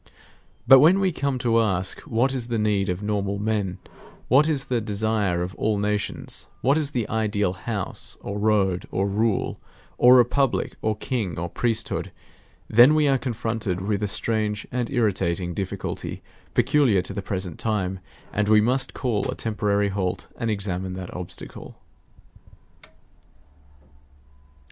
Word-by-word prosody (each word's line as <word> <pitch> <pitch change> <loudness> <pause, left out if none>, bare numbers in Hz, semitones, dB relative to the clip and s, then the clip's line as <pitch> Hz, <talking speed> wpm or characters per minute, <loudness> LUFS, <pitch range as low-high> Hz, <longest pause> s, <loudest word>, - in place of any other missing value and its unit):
But 135 - +9
when 170 +8 +6
we 190 -1 +2
come 140 -4 -1
to 115 -2 +2
ask 95 -3 -1
what 125 +4 +1
is 125 -3 -2
the 120 -1 -1
need 105 -2 +1
of 90 +3 -3
normal 100 -1 -1
men, 105 -3 -1 0.5
what 145 +5 +5
is 140 -4 0
the 120 -2 -1
desire 105 -4 0
of 90 +1 -5
all 110 -1 +1
nations, 105 0 -2
what 135 +3 +3
is 155 -3 +1
the 120 -7 -2
ideal 105 -4 0
house, 100 -1 -4
or 100 +1 -5
road, 100 -4 +1
or 95 - -1
rule, 105 +1 0 0.4
or 125 +1 +8
republic, 125 +2 +2
or 110 0 0
king, 105 -6 -3
or 85 +1 -2
priesthood, 115 +3 -1 0.6
then 120 +7 +6
we 155 -1 +3
are 135 -1 +3
confronted 115 -6 -2
with 100 +1 -1
a 105 - 0
strange 105 0 0
and 120 -1 -2
irritating 95 -7 0
difficulty 95 +1 -5 0.3
peculiar 125 -11 +3
to - - -6
the 100 - -3
present 95 -4 -4
time; 95 -4 -1 0.3
and 105 0 0
we 110 0 +6
must 125 +5 +1
call 115 -6 -1
a - - -2
temporary 105 -2 0
halt 95 -2 -2
and 115 - -2
examine 95 -3 -3
that 90 -1 -7
obstacle. 90 -1 -7
105 Hz, 150 wpm, -24 LUFS, 100-120 Hz, 0.6 s, But